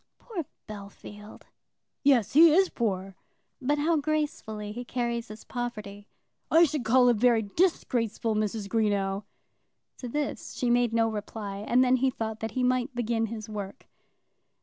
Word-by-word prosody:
"Poor 375 Hz, -10 st, -6 dB, 0.2 s
Bellfield!" 210 Hz, 0 st, -10 dB, 0.6 s
"Yes; 265 Hz, -7 st, +3 dB
he 320 Hz, +2 st, +8 dB
is 380 Hz, +1 st, +4 dB
poor." 195 Hz, -4 st, -2 dB, 0.5 s
"But 290 Hz, +3 st, +1 dB
how 320 Hz, +3 st, +2 dB
gracefully 295 Hz, -9 st, -2 dB
he 240 Hz, +3 st, -6 dB
carries 235 Hz, -1 st, -2 dB
his 215 Hz, +1 st, -10 dB
poverty." 215 Hz, -4 st, -6 dB, 0.4 s
"I 330 Hz, +1 st, +6 dB
should 300 Hz, -4 st, 0 dB
call 245 Hz, +2 st, +5 dB
it 240 Hz, -, +3 dB
very 235 Hz, 0 st, +4 dB
disgraceful, 230 Hz, -, 0 dB
Mrs. 215 Hz, -1 st, -2 dB
Greenow." 200 Hz, -2 st, 0 dB, 0.7 s
To 250 Hz, -, -6 dB
this 295 Hz, +3 st, -3 dB
she 245 Hz, -1 st, 0 dB
made 240 Hz, -1 st, +3 dB
no 225 Hz, 0 st, +2 dB
reply, 210 Hz, -2 st, -5 dB
and 235 Hz, +5 st, +2 dB
then 255 Hz, 0 st, +4 dB
he 265 Hz, +1 st, +2 dB
thought 220 Hz, -3 st, -4 dB
that 220 Hz, -1 st, -4 dB
he 255 Hz, -, +2 dB
might 255 Hz, +1 st, +1 dB
begin 230 Hz, -1 st, 0 dB
his 215 Hz, -1 st, -6 dB
work. 205 Hz, -2 st, -7 dB
230 Hz, 150 wpm, -28 LUFS, 210-255 Hz, 0.7 s, he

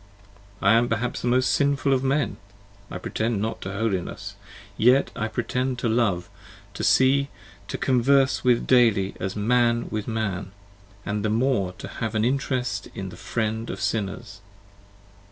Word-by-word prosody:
I 100 Hz, +2 st, +6 dB
am 120 Hz, +1 st, +3 dB
perhaps 115 Hz, +2 st, -2 dB
the -, -, -2 dB
most 125 Hz, +1 st, +3 dB
sinful 140 Hz, -1 st, +2 dB
of 130 Hz, 0 st, +1 dB
men! 135 Hz, 0 st, 0 dB, 0.5 s
I -, -, -5 dB
pretend 110 Hz, +4 st, -2 dB
not 110 Hz, +2 st, -3 dB
to 95 Hz, -, -5 dB
holiness! 100 Hz, -2 st, -3 dB, 0.4 s
yet 125 Hz, +6 st, +4 dB
I 110 Hz, -3 st, -2 dB
pretend 125 Hz, +3 st, -2 dB
to 125 Hz, -, -1 dB
love, 105 Hz, -6 st, +1 dB, 0.5 s
to -, -, -5 dB
see, 135 Hz, +1 st, +4 dB, 0.4 s
to -, -, -4 dB
converse 130 Hz, +1 st, +3 dB
with 125 Hz, -2 st, +4 dB
15 -, -, -7 dB
daily, 110 Hz, -7 st, +3 dB
as 95 Hz, +1 st, -3 dB
man 120 Hz, +2 st, +2 dB
with 110 Hz, -1 st, -3 dB
man, 100 Hz, -4 st, -3 dB, 0.3 s
& 100 Hz, 0 st, -27 dB
the 105 Hz, +1 st, -1 dB
more 110 Hz, -5 st, +1 dB
to 90 Hz, -, -9 dB
have 110 Hz, -1 st, -4 dB
an 110 Hz, 0 st, +2 dB
interest 125 Hz, -4 st, -1 dB
in 95 Hz, -1 st, -5 dB
the 90 Hz, -, -10 dB
Friend 110 Hz, +3 st, -3 dB
of -, -, -5 dB
Sinners. 100 Hz, -1 st, -3 dB
115 Hz, 160 wpm, -24 LUFS, 100-125 Hz, 0.5 s, I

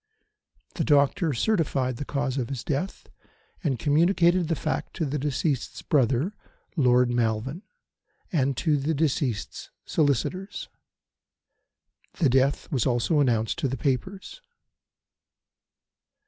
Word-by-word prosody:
The -, -, -1 dB
doctor 145 Hz, +2 st, +3 dB
certified 135 Hz, -, 0 dB
the 145 Hz, -, -5 dB
cause 140 Hz, -1 st, -2 dB
of 120 Hz, -, -3 dB
his 135 Hz, -4 st, -4 dB
death, 160 Hz, +6 st, -3 dB, 0.6 s
and 140 Hz, -7 st, 0 dB
communicated 170 Hz, -, +3 dB
the 165 Hz, -, 0 dB
fact 155 Hz, -, -3 dB
to 165 Hz, -, -1 dB
the 145 Hz, +1 st, -2 dB
deceased's 140 Hz, 0 st, -2 dB
brother, 135 Hz, -, +2 dB, 0.4 s
Lord 125 Hz, -4 st, +4 dB
Malven, 120 Hz, -, -1 dB, 0.7 s
and 140 Hz, -5 st, +1 dB
to 155 Hz, -4 st, +2 dB
the 150 Hz, +3 st, -1 dB
deceased's 140 Hz, -, -1 dB, 0.2 s
solicitors. 175 Hz, -, -1 dB, 1.4 s
The 155 Hz, -7 st, +2 dB
death 135 Hz, +2 st, +1 dB
was 130 Hz, -7 st, +1 dB
also 125 Hz, +5 st, +2 dB
announced 115 Hz, -5 st, +1 dB
to -, -, +1 dB
the 130 Hz, +1 st, -3 dB
papers. 190 Hz, -, -3 dB
140 Hz, 115 wpm, -26 LUFS, 130-160 Hz, 1.4 s, Lord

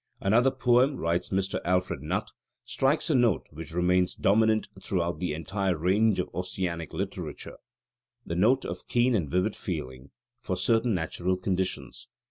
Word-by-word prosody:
"Another 115 Hz, +7 st, +4 dB
poem," 130 Hz, +1 st, +3 dB
writes 85 Hz, +1 st, -1 dB
Mr. 95 Hz, 0 st, -1 dB
Alfred 90 Hz, -5 st, 0 dB
Nutt, 75 Hz, -, -2 dB, 0.3 s
"strikes 140 Hz, +4 st, +1 dB
a -, -, +3 dB
note 120 Hz, -4 st, +3 dB
which 80 Hz, +1 st, -8 dB
remains 90 Hz, +1 st, +2 dB
dominant 110 Hz, +2 st, +3 dB
throughout 85 Hz, -3 st, -1 dB
the 90 Hz, -3 st, -1 dB
entire 95 Hz, +3 st, -1 dB
range 100 Hz, +5 st, +2 dB
of 90 Hz, -, -1 dB
Ossianic 90 Hz, -2 st, -3 dB
Literature: -, -, -5 dB, 0.7 s
the -, -, -4 dB
note 120 Hz, +9 st, +3 dB
of -, -, -6 dB
keen 120 Hz, +1 st, +2 dB
and 85 Hz, -10 st, 0 dB
vivid 90 Hz, +6 st, 0 dB
feeling 65 Hz, -7 st, -6 dB, 0.3 s
for 100 Hz, -7 st, -3 dB
certain 115 Hz, +3 st, +2 dB
natural 90 Hz, +2 st, -1 dB
conditions. 95 Hz, 0 st, -3 dB
95 Hz, 145 wpm, -28 LUFS, 85-110 Hz, 0.7 s, Another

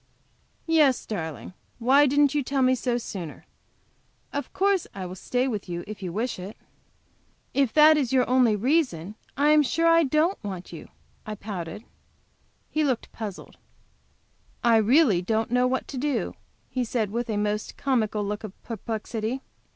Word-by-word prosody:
"Yes, 305 Hz, -6 st, +3 dB
darling; 160 Hz, -, -5 dB, 0.2 s
why 270 Hz, +5 st, +5 dB
didn't 285 Hz, +1 st, +3 dB
you 295 Hz, -, +1 dB
tell 270 Hz, 0 st, 0 dB
me 255 Hz, 0 st, +4 dB
so 245 Hz, -1 st, 0 dB
sooner? 185 Hz, -9 st, -7 dB, 0.9 s
Of 285 Hz, -2 st, -4 dB
course 390 Hz, -2 st, +1 dB
I 190 Hz, -2 st, -5 dB
will 180 Hz, -, -6 dB
stay 245 Hz, +7 st, -1 dB
with 210 Hz, -7 st, -4 dB
you 175 Hz, 0 st, -4 dB
if 215 Hz, 0 st, -8 dB
you 180 Hz, -2 st, -4 dB
wish 225 Hz, +3 st, -2 dB
it." 190 Hz, +4 st, -8 dB, 1.0 s
"If 275 Hz, -4 st, +2 dB
that 305 Hz, 0 st, +7 dB
is 270 Hz, -5 st, 0 dB
your 260 Hz, -1 st, +3 dB
only 250 Hz, -4 st, +4 dB
reason, 215 Hz, -, 0 dB, 0.2 s
I 290 Hz, +2 st, +3 dB
am 305 Hz, 0 st, +6 dB
sure 330 Hz, +4 st, 0 dB
I 330 Hz, 0 st, +6 dB
don't 310 Hz, +6 st, +1 dB
want 185 Hz, -4 st, -6 dB
you," 165 Hz, -, -9 dB, 0.4 s
I 215 Hz, -, -4 dB
pouted. 200 Hz, -1 st, -6 dB, 0.9 s
He 310 Hz, -, +1 dB
looked 260 Hz, -5 st, -1 dB
puzzled. 210 Hz, -4 st, -8 dB, 1.1 s
"I 235 Hz, -1 st, +5 dB
really 220 Hz, -, +4 dB
don't 220 Hz, +4 st, -1 dB
know 250 Hz, 0 st, +3 dB
what 260 Hz, +1 st, -1 dB
to 265 Hz, -, -4 dB
do," 290 Hz, 0 st, -1 dB, 0.4 s
he 255 Hz, -, 0 dB
said, 225 Hz, -3 st, -1 dB
with 235 Hz, +1 st, -3 dB
a 215 Hz, -, -1 dB
most 210 Hz, 0 st, -2 dB
comical 220 Hz, -6 st, 0 dB
look 210 Hz, +2 st, -4 dB
of 210 Hz, -3 st, -9 dB
perplexity. 225 Hz, +2 st, -4 dB
240 Hz, 165 wpm, -26 LUFS, 210-275 Hz, 1.1 s, that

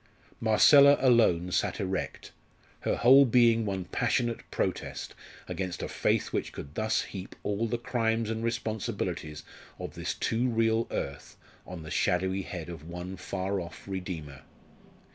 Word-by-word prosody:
Marcella 140 Hz, +6 st, +7 dB
alone 110 Hz, -9 st, +4 dB
sat -, -, 0 dB
erect, 95 Hz, -2 st, -3 dB, 0.5 s
her -, -, 0 dB
whole 135 Hz, +3 st, +7 dB
being 115 Hz, -3 st, +4 dB
one 95 Hz, -2 st, -2 dB
passionate 120 Hz, +6 st, 0 dB
protest -, -, -3 dB, 0.3 s
against 95 Hz, -3 st, -4 dB
a -, -, -2 dB
faith -, -, 0 dB
which -, -, -2 dB
could 70 Hz, -, -9 dB
thus 110 Hz, +4 st, 0 dB
heap 95 Hz, -2 st, -8 dB
all 105 Hz, +3 st, -1 dB
the 120 Hz, +2 st, -1 dB
crimes 115 Hz, -2 st, 0 dB
and 110 Hz, +1 st, -3 dB
responsibilities 110 Hz, -9 st, -3 dB, 0.3 s
of -, -, -6 dB
this -, -, -3 dB
too 120 Hz, +3 st, 0 dB
real 115 Hz, 0 st, +1 dB
earth 70 Hz, 0 st, -5 dB, 0.3 s
on 90 Hz, -3 st, -7 dB
the 80 Hz, -, -9 dB
shadowy 95 Hz, +2 st, +1 dB
head 90 Hz, -3 st, -6 dB
of 85 Hz, -4 st, -8 dB
one 90 Hz, +2 st, -6 dB
far 95 Hz, +2 st, -3 dB
off 85 Hz, +3 st, -10 dB
Redeemer. 85 Hz, -8 st, -6 dB
100 Hz, 145 wpm, -29 LUFS, 90-115 Hz, 0.5 s, Marcella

